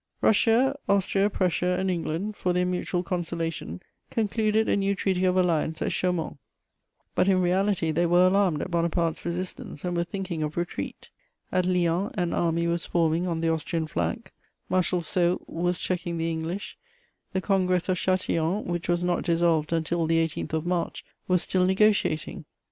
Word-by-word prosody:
Russia, 235 +5 +3
Austria, 200 0 +2
Prussia 180 -2 0
and 190 0 0
England, 175 +4 -2
for 180 -3 0
their 180 0 +2
mutual 180 0 -1
consolation, 165 - -3 0.3
concluded 220 0 +1
a - - +3
new 200 0 +1
treaty 190 -1 0
of 185 0 +2
alliance 160 -3 +1
at - - -1
Chaumont; 180 -5 -1 0.7
but - - +2
in 190 -1 +4
reality 185 -1 +1
they 170 +3 +2
were 175 +2 +5
alarmed 185 -4 +2
at 185 - -6
Bonaparte's 170 -1 0
resistance 175 -2 -5
and 175 0 -1
were 170 - +1
thinking 185 -3 -4
of 150 +1 -3
retreat. 175 +1 -4 0.4
At 180 -1 +1
Lyons 180 +3 +1
an 175 -4 -1
army 170 0 +1
was 170 0 0
forming 165 +1 +1
on 165 -2 -2
the 165 - +1
Austrian 160 0 -1
flank; 85 - -3 0.4
Marshal 185 -1 +1
Soult 175 +1 0
was 175 +1 -1
checking 175 -1 -2
the 165 0 -1
English; 165 +5 -4 0.5
the 190 - +1
Congress 185 -2 +1
of 185 - +2
Châtillon, 185 +1 0
which 175 0 -3
was 175 0 +1
not 175 0 +1
dissolved 165 -3 +2
until 165 0 0
the 165 0 +2
18th 160 - -5
of 160 0 -1
March, 175 -1 -2 0.2
was 180 -2 +2
still 185 -1 +1
negociating. 190 -5 +1
175 Hz, 165 wpm, -26 LUFS, 165-185 Hz, 0.7 s, were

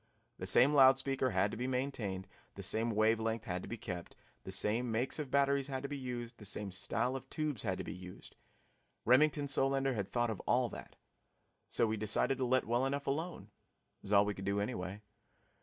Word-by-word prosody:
The - - -4
same 140 +4 +6
loud 135 -2 +7
speaker 135 -1 0
had 100 -1 +1
to - - -5
be 125 +2 -2
maintained, 125 -8 -2 0.3
the - - -7
same 115 +2 +1
wave 110 +1 +3
length 110 0 -2
had 90 0 -3
to - - -8
be 115 - -4
kept, 90 -6 -6 0.3
the - - -5
same 115 +3 0
makes 120 +7 -1
of 145 -3 -3
batteries 140 0 +2
had 135 -1 -4
to 140 - -4
be 145 - -3
used, 125 -3 -5
the - - -11
same 100 0 -2
style 120 +7 -1
of 135 0 -7
tubes 150 -8 -2
had 95 -4 -1
to - - -4
be - - -6
used. 90 0 -11 0.7
Remington 145 +4 +4
Solander 135 0 +1
had 100 -5 -2
thought 120 +2 0
of 105 - -5
all 125 -1 +3
that. - - -10 0.7
So - - +2
we 110 0 -1
decided 110 +5 +1
to 130 - +1
let 130 +1 +2
well 120 +3 +1
enough 140 +1 -2
alone 140 - -3 0.5
it - - -44
was 100 - -7
all 100 0 +6
we 105 - -1
could 95 - -8
do 100 +1 0
anyway. 100 -2 -4
120 Hz, 215 wpm, -34 LUFS, 105-135 Hz, 0.7 s, loud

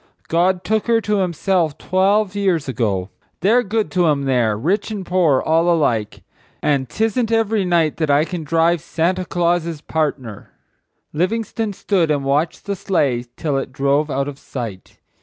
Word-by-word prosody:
God 180 +2 +2
took 220 +1 0
her 230 -1 +4
to 210 -1 0
Himself 175 -3 0
twelve 195 +2 +1
years 190 -7 0
ago. 105 -7 -1 0.3
They're 220 +7 +4
good 220 -1 -2
to 180 -2 +2
'em 145 -2 +1
there, 120 -6 +1
rich 190 - 0
and 205 -4 -5
poor 170 -7 +3
all 165 +2 +2
alike;—and 130 0 -2
't 220 - 0
isn't 225 +1 -1
every 220 -3 +1
night 170 -3 +1
I 145 +2 +4
can 175 -2 -5
drive 165 +2 +2
'Santa 175 +2 -1
Claus's 170 -3 -1
partner.'" 145 -10 -3 0.6
Livingstone 220 +5 -1
stood 185 -4 0
and 145 -2 0
watched 145 +4 0
the 200 0 -2
sleigh 145 -11 0
till 145 -4 -1
it 135 - -6
drove 140 +3 +1
out 140 0 -1
of 145 -1 -7
sight. 115 -8 -7
170 Hz, 160 wpm, -19 LUFS, 140-195 Hz, 0.6 s, her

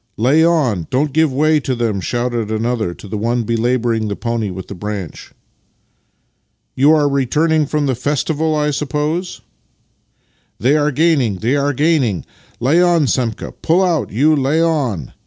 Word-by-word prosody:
"Lay 135 +8 +3
on! 135 - +1
Don't 140 +2 0
give 160 -1 +2
way 155 +3 +2
to 130 -2 -2
them!" 115 -5 -1
shouted 120 +1 -2
another 110 -2 -1
to - - -12
the 105 +1 -4
one 120 +2 0
belabouring 115 0 0
the 100 - -3
pony 115 -2 -2
with 95 0 -7
the - - -7
branch. 100 -3 -6 0.7
" - - -48
You 140 +4 +4
are 150 -2 +2
returning 150 +3 +1
from 150 0 -1
the 135 - +1
festival, 150 +5 -1
I 150 0 0
suppose? 150 +5 -3 0.4
" - - -45
" - - -43
They 130 +5 +2
are 150 -1 +2
gaining, 150 - +1
they 115 +9 -1
are 145 0 +1
gaining! 135 - +1 0.3
Lay 145 +9 +3
on, 175 -4 +3
Semka! 120 -4 -2
Pull 175 +4 +2
out, 175 -4 0
you! 150 +8 +3
Lay 140 +3 +1
on!" 135 - -1
135 Hz, 170 wpm, -17 LUFS, 115-155 Hz, 0.7 s, You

